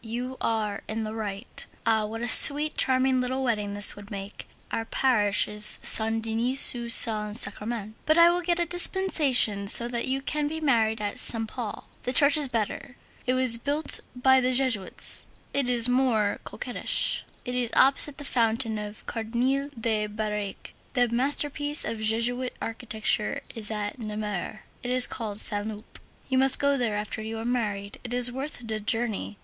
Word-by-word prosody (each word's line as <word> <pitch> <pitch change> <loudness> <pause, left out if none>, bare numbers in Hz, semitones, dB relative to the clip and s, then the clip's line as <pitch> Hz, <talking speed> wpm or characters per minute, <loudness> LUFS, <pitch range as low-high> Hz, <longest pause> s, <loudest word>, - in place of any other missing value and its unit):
You 245 +3 -7
are 215 -3 -3
in 220 +1 -5
the 215 0 -7
right. 210 0 -6 0.2
Ah! 220 -2 0
what 225 +2 -8
a - - -3
sweet, 295 +5 +9
charming 260 0 +1
little 260 +1 -4
wedding 210 -5 -3
this 205 0 +5
will 205 0 -14
make! 200 0 -9 0.2
Our 225 - -3
parish 220 -4 0
is 210 0 +2
Saint 225 0 +3
Denis 230 +4 +3
du 235 -1 -6
Saint 215 -2 +3
Sacrament, 220 -2 +2
but 310 +1 +2
I 340 0 +5
will 350 +1 -2
get 345 0 -2
a 345 - -1
dispensation 310 - +2
so 235 +4 +5
that 235 -1 -3
you 270 +1 -3
can 300 +1 -3
be 320 +2 -6
married 230 -7 0
at 205 -1 -5
Saint 225 -1 -1
Paul. 230 -4 -8
The 250 - -4
church 285 +2 +6
is 300 -2 +3
better. 240 +1 -5 0.3
It 255 - 0
was 255 -3 +4
built 290 +5 0 0.2
by 265 +1 +2
the 255 0 -1
Jesuits. 250 -7 +1 0.3
It 275 -3 0
is 240 -1 +5
more 245 -5 -1
coquettish. - - -2 0.2
It 250 - -6
is 250 -2 -2
opposite 275 +2 +5
the 290 - -8
fountain 230 -3 -2
of 210 0 -10
Cardinal 250 +5 -3
de 215 -2 -2
Birague. 210 -1 -7 0.2
The 245 -3 0
masterpiece 290 +4 +1
of 225 - -5
Jesuit 235 +3 -1
architecture 220 -2 -3
is 215 -2 -5
at 210 +2 -6
Namur. 210 -2 -6 0.2
It 245 - -7
is 255 0 +1
called 215 -3 -6
Saint 205 -1 0
Loup. 215 -1 -11 0.3
You 260 -1 -1
must 270 0 +7
go 280 0 0
there 240 -5 -3
after 210 +1 -6
you 220 +1 -7
are 225 - -7
married. 210 -5 -4
It 245 0 -6
is 245 0 +5
worth 265 -2 -8
the 220 -1 -4
journey. 215 -1 -3
235 Hz, 175 wpm, -24 LUFS, 215-260 Hz, 0.3 s, sweet